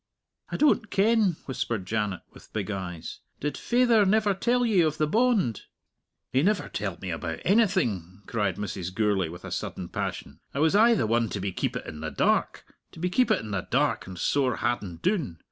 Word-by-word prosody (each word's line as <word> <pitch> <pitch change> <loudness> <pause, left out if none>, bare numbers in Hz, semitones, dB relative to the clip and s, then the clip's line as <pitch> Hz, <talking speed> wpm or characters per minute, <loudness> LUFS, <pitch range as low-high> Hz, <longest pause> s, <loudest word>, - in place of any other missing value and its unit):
"I - - -3
don't 265 -7 +3
ken," 210 -3 +3
whispered 115 -6 -3
Janet, 105 -2 -2
with - - -17
big 105 -1 -2
eyes. 90 -4 -6 0.2
"Did 145 +1 -2
faither 240 -3 +3
never 210 +1 +3
tell 245 +5 +1
ye 210 -6 +4
of 155 -2 +1
the 155 - +2
bond?" 210 - +2 0.7
"He 130 - +4
never 200 +4 +1
telled 95 -4 -4
me 95 - -3
about 80 0 -4
anything," 125 - +1
cried 100 -5 -1
Mrs. 95 -3 -4
Gourlay, 100 -6 +1
with 85 +2 -10
a - - -7
sudden - - -4
passion. 70 - -5 0.2
"I - - -1
was 160 +3 +3
aye 230 +3 +6
the - - +1
one 115 0 +1
to 100 - -4
be 100 0 -2
keepit - - -2
in 75 - -8
the 80 0 -3
dark - - +1 0.3
to - - -11
be 180 +2 -1
keepit 250 +6 +3
in 110 -1 -7
the 100 -2 -3
dark - - +1
and 95 -1 -8
sore 130 +5 +1
hadden 110 -7 -2
doon. 160 - 0
120 Hz, 195 wpm, -27 LUFS, -, 0.7 s, aye